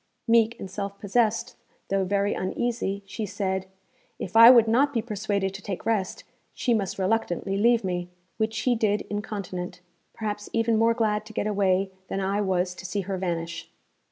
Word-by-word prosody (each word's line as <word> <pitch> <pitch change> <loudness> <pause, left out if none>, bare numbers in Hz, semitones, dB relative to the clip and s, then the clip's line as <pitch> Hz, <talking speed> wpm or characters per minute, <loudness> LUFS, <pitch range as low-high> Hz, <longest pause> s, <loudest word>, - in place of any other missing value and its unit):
Meek 230 0 +3
and - - -5
self 200 0 -4
possessed, 230 +3 +1 0.3
though 195 0 +1
very 200 +2 +1
uneasy, 200 0 -2
she 215 +3 -5
said, 190 -1 -2 0.5
'If 185 - -6
I 230 +1 +11
would 235 -3 +7
not 275 +6 +3
be 230 - +1
persuaded 205 -3 -2
to 195 - -8
take 195 -2 -5
rest, 210 -5 -1 0.3
she 245 - +1
must 200 -4 -1
reluctantly 195 -1 0
leave 230 +3 +3
me.' 180 -1 -2 0.3
Which 220 0 -1
she 250 +3 +1
did 215 -3 +1
incontinent, 195 -4 -5 0.3
perhaps 210 -2 -4
even 230 0 +2
more 230 +1 +3
glad 215 -2 +1
to 220 - -11
get - - -1
away 195 -2 +1 0.2
than 195 - -3
I 195 +2 0
was 185 -2 0
to 190 - -11
see 200 +2 -2
her 190 0 -3
vanish. 170 -2 -3
205 Hz, 175 wpm, -26 LUFS, 190-225 Hz, 0.5 s, I